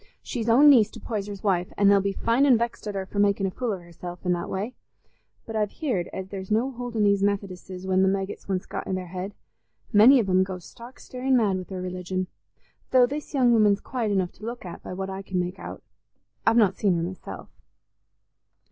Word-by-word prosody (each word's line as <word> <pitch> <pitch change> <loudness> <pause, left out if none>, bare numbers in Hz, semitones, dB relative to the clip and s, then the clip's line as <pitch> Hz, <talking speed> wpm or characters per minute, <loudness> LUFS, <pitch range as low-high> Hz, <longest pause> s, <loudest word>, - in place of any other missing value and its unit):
She's 230 -2 -3
own 265 +6 +7
niece 235 -7 +7
to - - -11
Poyser's 205 -3 -5
wife, 180 -3 +1
an' 200 - +4
they'll 200 0 +6
be 200 +1 0
fine 235 +7 +2
an' 255 -4 +6
vexed 235 -1 -3
at 205 - -4
her 190 -1 -2
for 200 +1 -4
making 200 -1 +3
a 190 - -1
fool 245 +3 -2
of 185 - -6
herself 175 +1 -9
i' - - 0
that 175 -1 -1
way. 205 +6 -3 0.7
But 225 - -7
I've 210 -1 +1
heared 235 - -2
as 190 0 -6
there's 190 -1 -6
no 230 +5 +1
holding 240 -3 -2
these 200 -1 +3
Methodisses 190 -2 -2
when 190 0 +2
the 190 - +4
maggit's 195 0 -3
once 185 -1 -1
got - - -5
i' - - -2
their 185 -1 -2
head: 185 +3 -5 0.6
many 240 +6 +8
of 215 - 0
'em 185 0 +4
goes 185 -2 -6
stark 240 +2 -13
starin' 255 +1 0
mad 205 -5 +2
wi' 185 - -4
their 185 -1 -6
religion. 185 0 -3 0.6
Though 255 -1 +6
this 290 +3 -5
young 250 -3 +4
woman's 210 -3 +4
quiet 235 -5 -2
enough 185 -3 +1
to - - -19
look 235 -1 -6
at, 175 - -8
by - - -7
what 190 +1 -4
I 190 0 -5
can 190 -2 -3
make 180 +1 -3
out; - - -8 0.6
I've 225 - +5
not 205 -5 +4
seen 195 -4 +2
her 165 - -1
myself." 170 - -7
200 Hz, 225 wpm, -25 LUFS, 185-230 Hz, 0.7 s, many